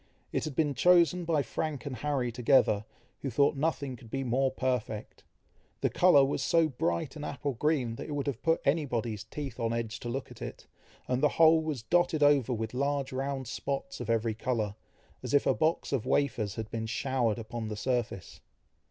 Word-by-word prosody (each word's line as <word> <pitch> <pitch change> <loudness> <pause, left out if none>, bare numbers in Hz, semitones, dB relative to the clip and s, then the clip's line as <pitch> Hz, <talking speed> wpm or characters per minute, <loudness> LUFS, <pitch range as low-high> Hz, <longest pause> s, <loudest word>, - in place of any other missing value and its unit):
It - - -1
had 155 -4 -5
been 150 -1 +1
chosen 175 +2 +4
by 160 -4 +2
Frank 155 -2 -3
and 135 -3 -4
Harry 130 -1 -1
together, 115 -3 +3 0.4
who 135 - -2
thought 140 +5 +3
nothing 140 -2 -1
could 120 -2 -14
be 135 +3 -2
more 130 +2 +1
perfect. 125 -5 -3 0.6
The - - +1
colour 175 -7 +6
was 140 - -1
so 165 -2 +3
bright 120 - -2
an 150 - -7
apple 145 -1 -3
green, 125 -3 0
that - - -6
it 150 - -4
would 145 -1 -2
have 135 -4 -3
put 165 -1 +2
any 150 +2 +2
body's 115 -4 -2
teeth 135 +2 -7
on 115 0 0
edge 115 -1 -3
to 120 - -5
look 135 +3 -4
at - - -13
it, - - -7 0.4
and 125 0 0
the 150 - +5
whole 160 0 +7
was 150 -7 -3
dotted 170 +2 +2
over 140 -4 +4
with 110 -1 -3
large 140 +1 -1
round 135 -1 -3
spots 135 +3 -4
of 120 -2 -5
every 115 -1 +1
colour, 110 -2 -1 0.5
as - - -1
if 145 - +4
a - - +4
box 160 +1 0
of 130 -3 -1
wafers 115 -9 0
had 110 -1 -5
been 110 -1 -3
showered 120 -1 0
upon 115 0 -5
the 105 -1 -5
surface. 120 -6 -2
130 Hz, 200 wpm, -30 LUFS, 115-145 Hz, 0.6 s, whole